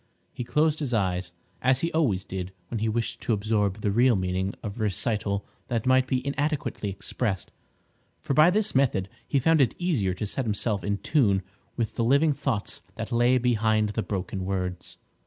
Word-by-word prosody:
He - - -4
closed 150 +5 +2
his 135 -6 -1
eyes, 90 -3 0 0.3
as 130 +1 +3
he 165 - 0
always 120 - +1
did 95 -1 -5 0.2
when 115 - -3
he 110 +1 0
wished 115 +1 -2
to 115 - 0
absorb 105 -1 0
the 100 - +1
real 120 +3 +4
meaning 95 +1 -1
of 105 -1 -5
a - - 0
recital 105 -1 -1 0.2
that 115 -2 -1
might 130 0 +4
be 130 0 -1
inadequately 140 -6 -1
expressed, 100 +1 -3 0.7
for - - -2
by 155 +4 +7
this 210 +3 +1
method 120 -8 +2 0.2
he 140 - +1
found 160 +3 +4
it 125 - +2
easier 125 - 0
to 105 - -3
set 125 +5 -2
himself 105 -1 -1
in 100 0 0
tune 100 -8 +2 0.3
with 115 -3 -2
the 115 - +2
living 140 +6 +4
thoughts 135 -7 -2
that - - -5
lay 120 +2 +4
behind 110 -3 +2
the 110 +2 -1
broken 95 -2 -3
words. 90 -1 -3
115 Hz, 185 wpm, -26 LUFS, 100-130 Hz, 0.7 s, by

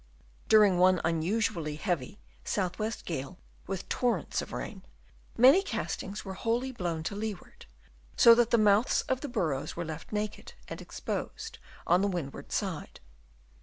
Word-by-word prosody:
During 205 -4 +6
one 185 0 +5
un 165 0 +1
usually 170 -5 -1
heavy 175 - -3 0.2
south 185 -3 -2
west 220 +2 -3
gale 160 +2 -4 0.3
with 190 -2 -4
torrents 245 -2 0
of - - -8
rain, - - -6 0.6
many 265 +10 +7
castings 205 - -4
were 190 - -5
wholly 235 +6 -1
blown 170 -9 -3
to 200 - -3
leeward, 220 - -6 0.5
so 235 - +9
that 235 0 +3
the 235 - +4
mouths 210 +2 +4
of 260 0 -1
the 290 - -4
burrows 155 - -1
were 170 - -3
left 160 0 -7
naked 210 0 -4
and - - -7
exposed 445 +2 -5 0.3
on 175 +2 +4
the 200 - +2
windward 145 -7 -5
side. 190 -7 -3
200 Hz, 155 wpm, -30 LUFS, 170-230 Hz, 0.6 s, so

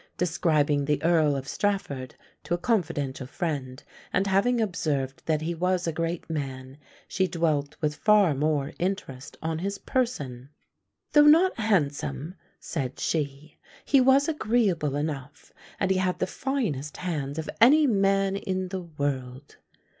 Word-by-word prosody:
Describing 155 -4 +1
the 150 0 +1
Earl 160 -4 +3
of 135 -1 -5
Strafford 170 -12 -2 0.3
to 175 - 0
a - - -3
confidential 145 - -1
friend, 140 -4 -4 0.3
and 190 - +1
having 200 +6 +2
observed 150 - -1
that 155 -1 +1
he 170 +2 -1
was 180 +1 0
a 165 - 0
great 165 +1 -3
man, 135 -3 -5 0.3
she 190 -1 0
dwelt 155 -5 -1
with 150 -1 +1
far 210 -6 +4
more 145 0 0
interest 175 -8 -4
on 160 0 -2
his 200 +3 -3
person: 140 - -2 0.6
"Though 295 0 +7
not 330 +1 +5
handsome," 150 - 0 0.3
said 135 -5 -4
she, 150 -1 -3 0.3
"he 275 -2 +5
was 270 +2 +5
agreeable 210 - +1
enough, 145 -1 -5 0.3
and 195 -1 +1
he 190 - +2
had 185 -1 0
the - - 0
finest 185 - -3
hands 150 -5 -3
of 160 -1 -4
any 295 +6 +7
man 195 -4 +2
in 185 -2 -3
the 190 0 -4
world." 140 -4 -4
165 Hz, 145 wpm, -26 LUFS, 145-195 Hz, 0.6 s, Though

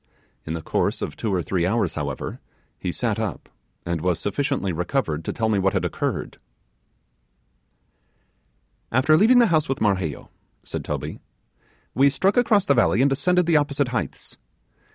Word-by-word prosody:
In 80 - -2
the 80 - -6
course - - -1
of - - -5
two 110 - -3
or 90 -3 0
three 90 0 -1
hours, 105 +7 +1
however, 70 -3 -4 0.4
he - - -2
sat - - -1
up, - - -4 0.4
and 85 -2 -2
was 90 -1 0
sufficiently 135 - -1
recovered 85 - -1
to - - -2
tell 110 - -1
me 105 -2 +2
what 95 0 +1
had - - 0
occurred. - - -3 2.5
'After 130 +6 +4
leaving 225 +9 +5
the 240 - +7
house 155 -3 +2
with 135 - -1
Marheyo,' 95 -8 -1 0.3
said - - -5
Toby, 75 +1 -4 0.7
'we 140 +2 +5
struck 190 +8 +1
across 220 -5 +3
the 140 - +4
valley, 120 0 +3
and 140 - +3
ascended 180 +6 +2
the 165 -2 +4
opposite 145 -2 0
heights. 120 - -5
120 Hz, 160 wpm, -23 LUFS, 90-145 Hz, 2.5 s, the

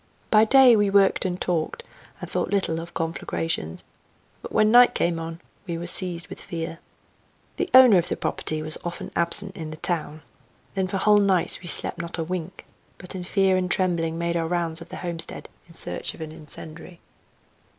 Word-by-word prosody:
By 215 0 +6
day 260 0 +7
we 205 -2 +2
worked 195 0 +3
and 180 -1 -2
talked, 175 - -2 0.4
and - - -7
thought - - -2
little 190 -5 0
of 170 +1 -9
conflagrations, 165 - -3 0.6
but - - -9
when 215 0 +3
night 245 +1 +7
came 170 -1 0
on 165 0 -6 0.3
we 170 -1 -3
were 170 - -5
seized 175 -1 -1
with - - -10
fear. 165 -1 -6 0.8
The 370 - -2
owner 250 -7 +8
of 170 - -3
the - - -2
property 155 0 -1
was 155 0 -3
often 175 0 -6
absent 190 +3 -1
in 160 -2 -6
the 155 - -8
town. 155 -2 -2 0.5
Then 190 -1 -1
for 195 - -3
whole 210 +2 +4
nights 195 -4 +1
we 175 - -8
slept 175 - +3
not 170 0 -6
a 165 - -1
wink, 180 +1 -6 0.3
but 180 - -6
in 185 -1 -5
fear 190 +1 +2
and 180 0 -1
trembling 170 -3 0
made 170 0 -1
our 165 -1 0
rounds 170 -1 -1
of 165 - -11
the - - -7
homestead 170 -2 -5 0.2
in 165 - -16
search - - -2
of - - -13
an 155 -1 -6
incendiary. 160 +3 -11
175 Hz, 190 wpm, -24 LUFS, 165-190 Hz, 0.8 s, owner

